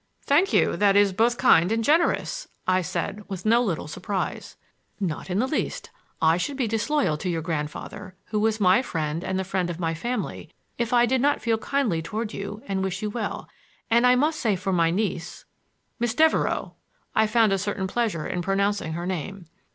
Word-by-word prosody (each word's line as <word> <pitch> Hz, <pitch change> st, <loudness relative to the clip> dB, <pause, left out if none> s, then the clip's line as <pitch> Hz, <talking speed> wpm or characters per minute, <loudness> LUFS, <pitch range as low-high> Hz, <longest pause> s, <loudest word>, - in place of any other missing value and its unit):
"Thank 335 Hz, +8 st, +3 dB
you; -, -, +3 dB
that 200 Hz, -1 st, +4 dB
is 200 Hz, -1 st, +4 dB
both 235 Hz, +4 st, +2 dB
kind 180 Hz, -7 st, +5 dB
and 225 Hz, 0 st, +1 dB
generous," 340 Hz, -, +1 dB, 0.2 s
I 185 Hz, 0 st, +3 dB
said 185 Hz, +4 st, -3 dB
with 190 Hz, -1 st, -6 dB
no 230 Hz, +2 st, +5 dB
little 185 Hz, -11 st, -2 dB
surprise. 195 Hz, +5 st, -4 dB, 0.4 s
"Not 180 Hz, -3 st, -3 dB
in 180 Hz, -, -1 dB
the 235 Hz, -, +2 dB
least. 305 Hz, -, -3 dB, 0.3 s
I 160 Hz, +1 st, +4 dB
should 275 Hz, +10 st, -3 dB
be 255 Hz, -4 st, 0 dB
disloyal 225 Hz, -, 0 dB
to 180 Hz, -, -3 dB
your 165 Hz, -2 st, -2 dB
grandfather, 165 Hz, +4 st, -5 dB
who 210 Hz, -, 0 dB
was 220 Hz, +1 st, +1 dB
my 190 Hz, +3 st, +5 dB
friend 160 Hz, -, -3 dB
and 190 Hz, -, -2 dB
the 190 Hz, -, 0 dB
friend 185 Hz, -1 st, -1 dB
of 170 Hz, 0 st, -5 dB
my 165 Hz, -2 st, -1 dB
family, 235 Hz, +7 st, -4 dB, 0.3 s
if 235 Hz, -2 st, -1 dB
I 240 Hz, -1 st, +5 dB
did 255 Hz, +1 st, +1 dB
not 290 Hz, +2 st, +2 dB
feel 225 Hz, -2 st, +1 dB
kindly 225 Hz, -10 st, 0 dB
toward 215 Hz, +5 st, -4 dB
you 205 Hz, +2 st, -6 dB
and 190 Hz, -1 st, -2 dB
wish 190 Hz, +1 st, -3 dB
you 210 Hz, -, -2 dB
well. 220 Hz, -1 st, -4 dB, 0.4 s
And 235 Hz, +2 st, +5 dB
I 250 Hz, -, +6 dB
must 305 Hz, +5 st, +1 dB
say 220 Hz, -5 st, +1 dB
for 190 Hz, +1 st, -2 dB
my 165 Hz, -2 st, +3 dB
niece—" 175 Hz, -2 st, -3 dB, 0.5 s
"Miss 240 Hz, 0 st, 0 dB
Devereux." 320 Hz, +2 st, +2 dB, 0.4 s
I 220 Hz, 0 st, +3 dB
found 215 Hz, -1 st, +3 dB
a 195 Hz, -, +1 dB
certain 200 Hz, 0 st, -2 dB
pleasure 195 Hz, -6 st, -1 dB
in 180 Hz, -, -2 dB
pronouncing 195 Hz, -2 st, 0 dB
her 170 Hz, +2 st, -4 dB
name. 185 Hz, +1 st, -4 dB
205 Hz, 200 wpm, -25 LUFS, 180-235 Hz, 0.5 s, I